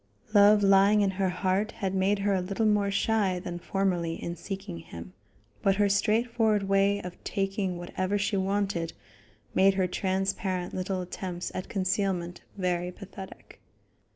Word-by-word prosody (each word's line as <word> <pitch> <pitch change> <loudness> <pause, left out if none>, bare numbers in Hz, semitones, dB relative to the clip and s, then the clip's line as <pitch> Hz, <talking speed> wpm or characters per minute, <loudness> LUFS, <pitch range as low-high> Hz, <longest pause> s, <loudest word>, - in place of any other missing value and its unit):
Love 205 0 +6
lying 200 +2 +5
in 195 -1 +2
her 190 0 0
heart 190 +4 0
had 195 -3 -3
made 195 +2 +2
her 200 0 +1
a 190 - +1
little 195 +5 -1
more 210 -2 +3
shy 200 -2 +1
than 175 -1 -5
formerly 175 -3 -1
in 170 +1 -5
seeking 190 0 -6
him, 90 - -10 0.5
but 195 -1 +3
her 205 0 +3
straightforward 215 +1 +2
way 195 +1 +2
of 180 0 -9
taking 195 -2 -2
whatever 185 +3 -2
she 205 +1 0
wanted 195 -3 -1 0.6
made 195 0 +4
her 190 -1 +2
transparent 185 0 -1
little 185 0 -2
attempts 180 0 -5
at 185 - -5
concealment 185 -2 -1 0.2
very 180 -1 -1
pathetic. 190 +1 -11
195 Hz, 150 wpm, -28 LUFS, 180-200 Hz, 0.6 s, Love